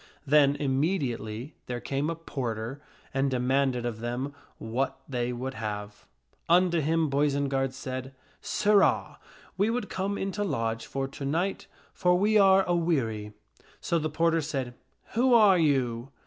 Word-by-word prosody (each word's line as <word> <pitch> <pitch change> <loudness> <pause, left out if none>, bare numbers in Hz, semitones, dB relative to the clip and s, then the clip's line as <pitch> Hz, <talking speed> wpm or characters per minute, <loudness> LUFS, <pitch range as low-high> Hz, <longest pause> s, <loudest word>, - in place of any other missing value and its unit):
Then 145 -1 +5
immediately 135 - -1
there 125 -1 -3
came 140 +5 -2
a 165 - -2
porter 130 -4 -4 0.3
and 135 0 +1
de 130 - 0
manded 130 -1 +1
of 115 -2 -3
them 120 +4 -3 0.2
what 120 +4 -2
they 125 -2 -2
would 130 +2 -4
have. 105 -2 -6 0.4
Unto 175 0 +4
him 160 +1 +1
Boisenard 140 -1 +1
said, 130 0 -5 0.2
" - - -34
Sirrah, 205 -1 +2 0.4
we 200 +3 +2
would 240 +2 -2
come 195 +2 -2
in 195 - -2
to 205 - -2
lodge 115 - -2
for 135 0 -2
to 140 - -8
night, 170 +8 -1 0.3
for 180 -1 +3
we 210 +3 +2
are 195 -1 +6
a 175 - 0
weary." 115 -11 -1 0.5
So 170 -2 0
the 155 0 -2
porter 165 +1 +2
said, 135 -5 -3 0.4
"Who 245 +2 +4
are 205 -5 +6
you?" 130 -5 +1
140 Hz, 155 wpm, -28 LUFS, 125-170 Hz, 0.5 s, are